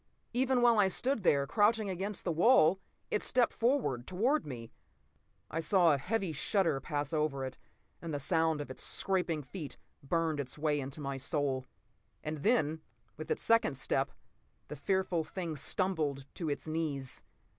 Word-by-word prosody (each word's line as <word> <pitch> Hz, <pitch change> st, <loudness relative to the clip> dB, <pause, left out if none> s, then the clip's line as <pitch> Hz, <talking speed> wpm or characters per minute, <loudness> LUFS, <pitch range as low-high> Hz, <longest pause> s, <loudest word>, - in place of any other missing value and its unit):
Even 255 Hz, 0 st, +2 dB
while 235 Hz, -3 st, +5 dB
I 200 Hz, -, +5 dB
stood 250 Hz, +5 st, 0 dB
there, 140 Hz, -6 st, +3 dB
crouching 215 Hz, +6 st, +2 dB
against 195 Hz, +2 st, -3 dB
the 175 Hz, -, 0 dB
wall, 180 Hz, 0 st, +5 dB, 0.3 s
it -, -, +1 dB
stepped 245 Hz, -2 st, +2 dB
forward 230 Hz, -, 0 dB
toward 235 Hz, -, +1 dB
me. 115 Hz, -4 st, -7 dB, 0.8 s
I 165 Hz, -, -1 dB
saw 170 Hz, -1 st, +4 dB
a 140 Hz, -, 0 dB
heavy 195 Hz, +2 st, -1 dB
shudder 165 Hz, 0 st, +1 dB
pass 145 Hz, +2 st, -3 dB
over 150 Hz, -3 st, 0 dB
it, 130 Hz, -, -7 dB, 0.4 s
and 170 Hz, -, -5 dB
the 145 Hz, -, -2 dB
sound 160 Hz, +1 st, +1 dB
of 145 Hz, -, -6 dB
its -, -, -7 dB
scraping 180 Hz, -6 st, 0 dB
feet 155 Hz, +1 st, -7 dB, 0.2 s
burned 160 Hz, +1 st, 0 dB
its 135 Hz, 0 st, -5 dB
way 150 Hz, -1 st, +1 dB
into 140 Hz, +2 st, -5 dB
my 140 Hz, -1 st, -3 dB
soul. 135 Hz, -2 st, -1 dB, 0.6 s
And 155 Hz, -1 st, -4 dB
then, 160 Hz, -7 st, +2 dB, 0.3 s
with 155 Hz, +3 st, -8 dB
its -, -, -1 dB
second 230 Hz, -, +3 dB
step, 135 Hz, -1 st, 0 dB, 0.6 s
the 150 Hz, -, -5 dB
fearful 180 Hz, +2 st, 0 dB
thing 170 Hz, -1 st, -5 dB
stumbled 150 Hz, -3 st, -1 dB
to 165 Hz, -3 st, -3 dB
its 145 Hz, -, -3 dB
knees. 150 Hz, -5 st, -3 dB
160 Hz, 165 wpm, -32 LUFS, 145-195 Hz, 0.8 s, while